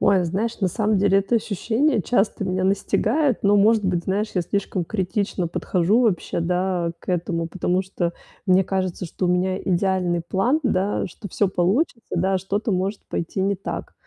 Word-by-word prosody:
Ой, 195 -3 +4
знаешь, 210 +8 -2
на 190 - +2
самом 210 +3 +1
деле 195 0 +4
это 200 +5 0
ощущение 225 +4 +1
часто 205 0 0
меня 185 0 -1
настигает, 225 +7 +1
но, 205 +1 +5
может 210 0 +4
быть, 175 -2 0
знаешь, 205 +3 -1
я 180 - +1
слишком 190 0 -2
критично 190 -1 -2
подхожу 185 +6 +1
вообще, 205 -9 0
да, 180 0 0
к - - -21
этому, 170 -1 -1
потому 180 +1 0
что 180 -2 -2 0.3
мне 185 -1 +4
кажется, 185 -1 -2
что 180 - -3
у - - +1
меня 185 +1 +1
идеальный 180 -2 +1
план, 195 - +1
да, 205 -5 0
что 200 +3 -10
всё 205 - +1
получится, 210 - 0
да, 190 +2 +1
что-то 205 +5 -2
может 195 +2 -1
пойти 170 +3 -3
не 200 +1 +1
так. 190 - -6
190 Hz, 175 wpm, -23 LUFS, 180-205 Hz, 0.3 s, но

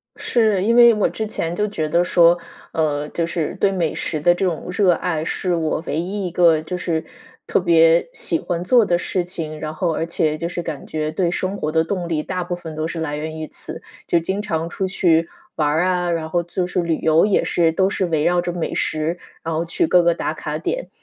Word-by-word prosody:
是。 215 -5 +1
因 230 +3 +2
为 235 -1 +8
我 210 - +1
之 220 - -4
前 170 -5 -2
就 210 +2 0
觉 160 -7 -2
得 170 +3 +2
说， 175 -1 +5 0.4
呃， 150 -2 0
就 170 - -1
是 165 -2 -3
对 195 - +3
美 170 -5 -1
食 155 - -2
的 175 +4 +4
这 190 - -1
种 175 -2 -2
热 185 0 +3
爱， 160 -2 -2
是 180 +1 -1
我 160 -1 -1
唯 150 +3 -1
一 190 +2 -3
一 175 - -6
个 165 -3 +4
就 180 +3 -5
是 165 -3 -2 0.4
特 - - +2
别 165 -1 +4
喜 165 - +2
欢 175 -1 -3
做 230 +4 +4
的 175 -2 +2
事 180 0 -1
情， 160 -3 -5
然 155 0 -4
后 165 0 -1
而 165 - -1
且 155 -2 0
就 170 +2 -3
是 175 - -4
感 155 -4 -6
觉 155 0 -3
对 175 +1 0
生 190 +2 -2
活 155 -3 -2
的 160 0 +2
动 175 0 -3
力， 155 -2 -1
大 185 -1 -3
部 175 0 -3
分 160 -3 -8
都 155 +1 -2
是 165 0 -5
来 150 -2 -2
源 155 +1 -5
于 155 - -5
此。 - - -7 0.3
就 170 - +3
经 190 +5 -2
常 165 -4 -2
出 190 +1 -2
去 170 -3 +2 0.3
玩 150 -2 +1
儿 160 +4 +2
啊， 180 -1 0
然 160 -1 -2
后 175 +1 0
就 175 +1 -2
是 180 0 -1
旅 165 -2 0
游 160 +2 +4
也 205 - +2
是， 165 -2 +2
都 190 +3 +2
是 190 -1 -1
围 160 -3 0
绕 175 0 +2
着 175 - -3
美 170 -1 -3
食， 160 +3 -1 0.3
然 165 - -3
后 165 - 0
去 165 -1 0
各 180 -1 +5
个 170 0 +4
打 - - -3
卡 - - -4
点。 - - -3
170 Hz, 260 characters per minute, -21 LUFS, 160-180 Hz, 0.4 s, 为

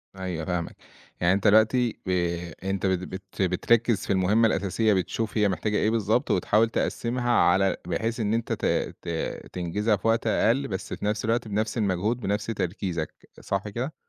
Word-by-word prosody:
أيوه، 90 -4 -4
فاهمك، 90 -2 -3 0.5
يعني 85 +1 +4
أنت 100 +2 +1
دلوقتي 110 +3 +4
ب 95 - -4 0.5
أنت 95 0 -2
بت 95 -2 +2
بت 95 +1 -7
بتركّز 110 +4 +2
في - - +1
المهمة 105 +5 +3
الأساسية، 105 +2 +1
بتشوف 110 +5 -2
هي 105 -1 +3
محتاجة 105 +3 -1
إيه 110 - +2
بالضبط، 110 +1 +1
وتحاول 105 +5 +3
تقسّمها 120 +1 -1
على 95 -3 +3
بحيث 115 +6 -2
إن 105 -1 0
أنت 115 0 -1
ت - - -3 0.4
ت - - -14 0.5
تنجزها 100 +5 0
في 115 - -3
وقت 115 0 +2
أقل، 120 +5 +2
بس 95 -2 -5
في - - -5
نفس 105 +1 -1
الوقت، 115 +1 0
بنفس 110 +3 -1
المجهود، 105 +3 0
بنفس 105 -1 -1
تركيزك، 90 -6 -4
صح 100 +1 -2
كده؟ 125 +9 -4
105 Hz, 170 wpm, -26 LUFS, 95-115 Hz, 0.5 s, يعني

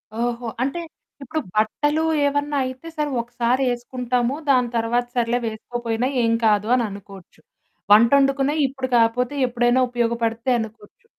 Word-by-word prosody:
ఓహో! 240 +1 -2 0.2
అంటే, 280 +6 -2 0.4
ఇప్పుడు 305 +4 -3 0.2
బట్టలు 295 +9 +1 0.2
ఏవన్నా 285 +1 0
అయితే, 260 +5 -7
సరే 300 -1 0
ఒకసారేసుకుంటాము, 245 +1 -1
దాని 250 -3 +3
తర్వాత 235 +2 0
సర్లే 240 0 +1
వేసుకోపోయినా 230 +2 -3
ఏం 230 -1 +2
కాదు 210 -1 +3
అననుకోచ్చు. 200 -7 -6 0.5
వంటొడుకునేయి 275 +6 +4
ఇప్పుడు 265 0 -5
కాపోతే 235 +4 +1
ఎప్పుడైనా 240 +1 +2
ఉపయోగపడతయి 235 0 0
అనుకోచ్చు, 225 - -9
240 Hz, 115 wpm, -22 LUFS, 230-265 Hz, 0.5 s, వంటొడుకునేయి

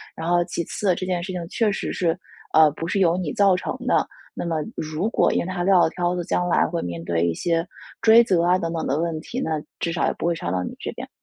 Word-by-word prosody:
然 160 +1 -4
后 175 0 +4
其 170 - -3
次， 185 +2 0
这 185 - -4
件 180 -1 -1
事 185 +2 -5
情 175 -2 -4
确 225 +2 +1
实 200 - -2
是， 170 -1 0 0.4
呃， 155 -1 +7
不 165 +3 -5
是 195 - 0
由 175 -2 +3
你 170 -6 -3
造 200 -2 +4
成 185 - -3
的， - - +2 0.3
那 - - -4
么 165 -2 -1 0.2
如 155 +6 -2
果 - - +2
因 - - +2
为 - - -4
他 185 -1 -2
撂 190 0 +5
了 - - +4
挑 175 0 -1
子， 175 - -2
将 180 - 0
来 175 - +3
会 170 - -3
面 85 -1 -5
对 85 0 0
一 85 - 0
些 165 - -1 0.3
追 225 +1 +7
责 185 -7 +2
啊， 180 +1 +4
等 165 -1 -2
等 165 - -2
的 140 +3 0
问 165 -1 -1
题， 245 - -5
那 160 - -1 0.2
至 170 - -1
少 170 - 0
也 - - 0
不 - - -5
会 170 - +1
烧 90 - -4
到 90 0 -1
你 - - -6
这 - - -4
边。 - - -8
170 Hz, 300 characters per minute, -23 LUFS, 160-185 Hz, 0.4 s, 呃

